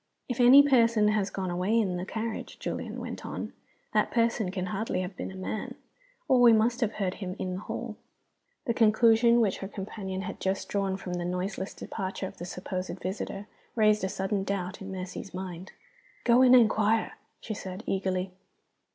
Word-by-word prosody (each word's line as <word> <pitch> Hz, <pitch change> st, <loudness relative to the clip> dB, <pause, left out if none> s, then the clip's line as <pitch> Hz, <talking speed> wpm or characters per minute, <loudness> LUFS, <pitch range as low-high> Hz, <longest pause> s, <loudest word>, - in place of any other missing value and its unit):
"If 245 Hz, -1 st, -4 dB
any 255 Hz, +3 st, +9 dB
person 230 Hz, -5 st, +4 dB
has 210 Hz, -2 st, +1 dB
gone 190 Hz, -2 st, -3 dB
away 185 Hz, +6 st, +1 dB
in 190 Hz, -5 st, 0 dB
the 180 Hz, +1 st, -4 dB
carriage," 225 Hz, +1 st, -4 dB
Julian -, -, -4 dB
went -, -, -6 dB
on, -, -, -5 dB, 0.4 s
"that -, -, +3 dB
person 230 Hz, -4 st, +1 dB
can 185 Hz, 0 st, -3 dB
hardly 195 Hz, -2 st, -1 dB
have 185 Hz, +1 st, -5 dB
been -, -, -5 dB
a -, -, -10 dB
man, 190 Hz, +3 st, -4 dB, 0.5 s
or 260 Hz, -3 st, +4 dB
we 240 Hz, -2 st, +8 dB
must 230 Hz, +2 st, +2 dB
have 225 Hz, -2 st, +1 dB
heard 190 Hz, -3 st, -1 dB
him 185 Hz, -1 st, -4 dB
in 185 Hz, -1 st, -3 dB
the 185 Hz, -, -4 dB
hall." 215 Hz, +1 st, -6 dB, 0.7 s
The 235 Hz, -, +1 dB
conclusion 230 Hz, +1 st, +5 dB
which 205 Hz, -4 st, +1 dB
her 195 Hz, -, -5 dB
companion 190 Hz, -1 st, -5 dB
had 195 Hz, 0 st, -6 dB
just 190 Hz, 0 st, -1 dB
drawn 195 Hz, -1 st, -1 dB
from 185 Hz, -2 st, -6 dB
the 175 Hz, 0 st, -2 dB
noiseless 185 Hz, +2 st, -3 dB
departure 190 Hz, -1 st, -4 dB
of -, -, -8 dB
the 175 Hz, -, -5 dB
supposed 185 Hz, 0 st, -5 dB
visitor 195 Hz, +2 st, -4 dB, 0.3 s
raised 215 Hz, -2 st, +3 dB
a 190 Hz, -, 0 dB
sudden 195 Hz, +1 st, -1 dB
doubt 195 Hz, -1 st, -3 dB
in 195 Hz, 0 st, -6 dB
Mercy's 185 Hz, 0 st, -6 dB
mind. 185 Hz, -1 st, -6 dB, 0.5 s
"Go 240 Hz, +1 st, +5 dB
and 255 Hz, -1 st, +7 dB
inquire!" 220 Hz, -2 st, +3 dB, 0.3 s
she 220 Hz, -, -5 dB
said, 190 Hz, 0 st, -7 dB
eagerly. 190 Hz, -1 st, -1 dB
195 Hz, 185 wpm, -28 LUFS, 185-225 Hz, 0.7 s, any